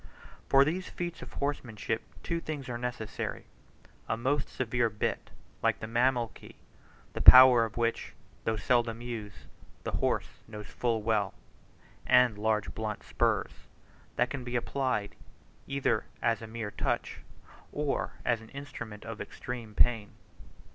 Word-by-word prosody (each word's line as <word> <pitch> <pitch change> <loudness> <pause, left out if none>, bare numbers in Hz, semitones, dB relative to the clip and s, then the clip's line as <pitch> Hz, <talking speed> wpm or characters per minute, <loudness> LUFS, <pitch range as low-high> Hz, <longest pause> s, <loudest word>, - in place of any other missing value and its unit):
For 135 0 +7
these 180 +5 -2
feats 175 -1 -5
of - - -10
horsemanship 115 -6 -2 0.2
two 170 - -1
things 150 -5 -5
are 120 - -3
necessary: 120 -3 -4 0.6
a 110 - +1
most 135 +4 0
severe 120 -2 0
bit, 105 0 -2 0.3
like - - +2
the - - -5
Mameluke, 120 +1 0 0.6
the - - -3
power 125 -2 +10
of 110 - -9
which, 115 0 -1 0.3
though 110 - 0
seldom 115 +2 +1
used, 110 -4 -7 0.4
the - - -3
horse - - -1
knows 105 -1 -8
full 115 +1 -1
well; 105 -3 +1 0.7
and 125 -3 +5
large 105 0 0
blunt 110 -1 -4
spurs, - - 0 0.6
that 120 +1 +1
can 135 -3 -4
be 120 0 -4
applied 120 -3 -1 0.5
either 140 -5 0
as 115 -2 +1
a 115 - -7
mere 110 -2 -5
touch, - - -2 0.5
or 145 -1 -1
as 115 -2 +1
an 110 - -13
instrument 125 -7 -8
of - - -6
extreme 115 -4 -7
pain. 115 -3 +3
120 Hz, 140 wpm, -30 LUFS, 110-130 Hz, 0.7 s, power